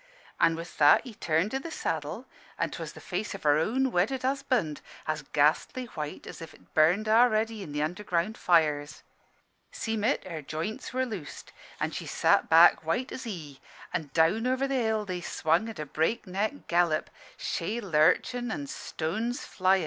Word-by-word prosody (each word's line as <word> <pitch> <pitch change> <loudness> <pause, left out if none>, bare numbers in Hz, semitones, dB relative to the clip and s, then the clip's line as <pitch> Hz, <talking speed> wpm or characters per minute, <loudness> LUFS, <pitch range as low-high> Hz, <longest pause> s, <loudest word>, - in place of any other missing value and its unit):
"An' 165 -1 +4
with 165 +1 -9
that 145 -1 +7
he 245 - -9
turned 170 +3 0
i' 265 - 0
the 330 - -7
saddle; - - -3 0.3
an' - - -1
'twas - - -6
the - - -11
face 210 - -4
o' - - -7
her 150 0 +4
own 255 +10 +1
wedded 230 +9 +1
husband, 260 - 0 0.3
as 155 -1 -1
ghastly 155 - +2
white 150 -1 -5
as - - -9
if 165 - -9
't - - -22
burned 175 +8 +4
a'ready 220 -1 +3
i' 190 - -7
the 150 0 -2
underground 180 +4 -1
fires. 155 -5 +1 0.7
"Seem' 220 -2 -3
it, 245 +6 +1
her 165 -4 -5
joints 155 +9 -5
were 260 0 0
loosed, 200 - -7 0.3
an' - - -1
she - - -6
sat - - +2
back 165 0 +7
white 235 +11 -1
as 260 - -6
he; 155 - -7 0.3
an' 150 - -2
down 170 +9 +3
over 260 +2 +1
the 275 - -2
hill 220 -4 +1
they 180 -2 -4
swung 170 +6 +1
at 225 - -8
a 150 - -4
breakneck 200 - -1
gallop, 170 -2 +1 0.3
shay 210 +8 -2
lurchin' 205 +7 +2
and 145 -10 -4
stones 220 - -3
flyin'. 190 +1 +2
185 Hz, 175 wpm, -28 LUFS, 160-230 Hz, 0.7 s, that